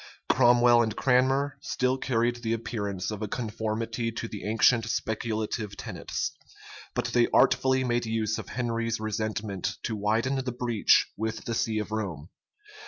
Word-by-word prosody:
Cromwell 120 -1 +6
and 110 -2 -1
Cranmer 135 +2 +2
still 130 0 0
carried 120 -1 +1
the 115 -1 -2
appearance 105 -4 -3
of 105 0 -5
a 110 - -2
conformity 115 +1 -3
to 115 0 -5
the 105 -3 -7
ancient 110 +1 +3
speculative 110 -2 -2
tenets; - - -4 0.6
but - - 0
they 120 -1 +4
artfully 130 0 +4
made 120 -2 0
use 110 -1 -1
of - - -8
Henry's 115 -2 -1
resentment 105 -3 -3
to 110 - -2
widen 115 +6 0
the 125 - -2
breach 120 -3 +3
with 110 +1 -4
the 115 - -2
see 110 -1 0
of 105 0 -3
Rome. 95 -8 -4
115 Hz, 150 wpm, -27 LUFS, 110-120 Hz, 0.6 s, Cromwell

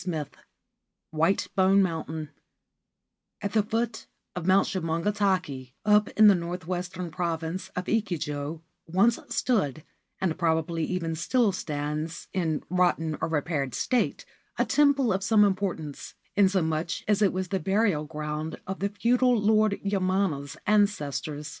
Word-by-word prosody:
214 160 -6 -4
XXXV - - -24 0.7
WHITE 185 +4 +2
BONE 195 +1 +5
MOUNTAIN 160 -3 -3 1.1
AT 205 - -2
the 220 - +4
foot 225 +2 -2 0.3
of 180 -1 -4
Mount 190 +1 +5
Shumongatake, 170 -6 -1
up 210 0 +5
in 215 - +8
the 205 - +8
north 175 0 -4
western 180 -1 -4
province 170 +2 -3
of 180 - -3
Echigo, 160 -8 -2 0.3
once 195 +8 +3
stood, 155 - 0 0.4
and 180 -2 -1
probably 165 -1 0
even 170 -3 -2
still 215 +7 +2
stands 155 -1 -4
in 165 -5 -1
rotten 175 -3 +1
or - - +1
repaired 150 -4 -1
state, 250 - 0 0.3
a - - +2
temple 280 -6 +3
of 190 +1 -2
some 215 0 +5
importance, 185 -7 -3 0.2
inasmuch 180 -4 +1
as 210 0 +2
it 200 - +4
was 185 -1 -3
the 190 -1 0
burial 190 -4 +1
ground 150 +1 -5
of 190 +1 -5
the 200 - 0
feudal 245 +3 +2
Lord 215 0 +3
Yamana's 185 -7 0
ancestors. 155 -8 0
180 Hz, 135 wpm, -27 LUFS, 160-205 Hz, 1.1 s, in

